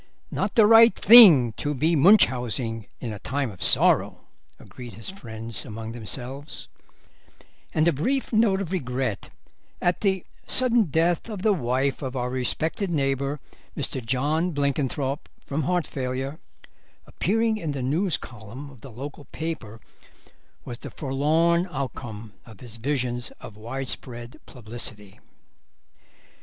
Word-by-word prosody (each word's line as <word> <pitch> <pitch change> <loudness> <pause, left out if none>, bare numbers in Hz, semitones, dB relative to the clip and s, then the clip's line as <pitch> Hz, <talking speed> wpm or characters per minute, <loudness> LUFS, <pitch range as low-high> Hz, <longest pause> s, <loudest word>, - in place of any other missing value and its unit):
"Not - - -2
the 225 -4 +7
right 225 -1 +7
thing 180 - +9
to 145 0 -2
be 160 +5 +2
Munchausening 125 - +3
in 115 -4 -5
a 105 - -8
time 135 +2 -2
of 95 - -14
sorrow" - - +3 0.4
agreed 120 -2 -11
his 115 - -7
friends 115 - -8
among 110 +1 -7
themselves, 125 +5 -6 1.0
and 155 +1 +2
a 170 - +4
brief 255 - -1
note 215 -3 +3
of 180 -3 -5
regret 130 - -3 0.5
at 175 0 0
the 190 -3 0 0.2
"sudden 245 -3 +3
death 165 +6 0
of 205 -4 -6
the 215 - +4
wife 130 -3 -1
of 130 -2 -5
our 125 -1 -2
respected 155 - -1
neighbour, 140 -2 -1 0.4
Mr. 130 - -3
John 150 +8 0
Blenkinthrope, 140 0 -1 0.2
from 145 +3 -2
heart 175 +3 0
failure," 135 +3 -4 0.7
appearing 220 +4 0
in 165 -7 -4
the 135 -2 -4
news 160 +4 +1
column 120 +5 -10
of 130 -5 -17
the 135 - -10
local 140 +5 -8
paper 130 -11 -6 0.9
was 120 0 -7
the - - -8
forlorn 160 +6 +1
outcome 120 -6 -6
of 110 -4 -15
his 115 -3 -10
visions 125 -1 -2
of 105 - -11
widespread 120 +1 -5
publicity. 110 -4 -8
135 Hz, 135 wpm, -25 LUFS, 120-170 Hz, 1.0 s, thing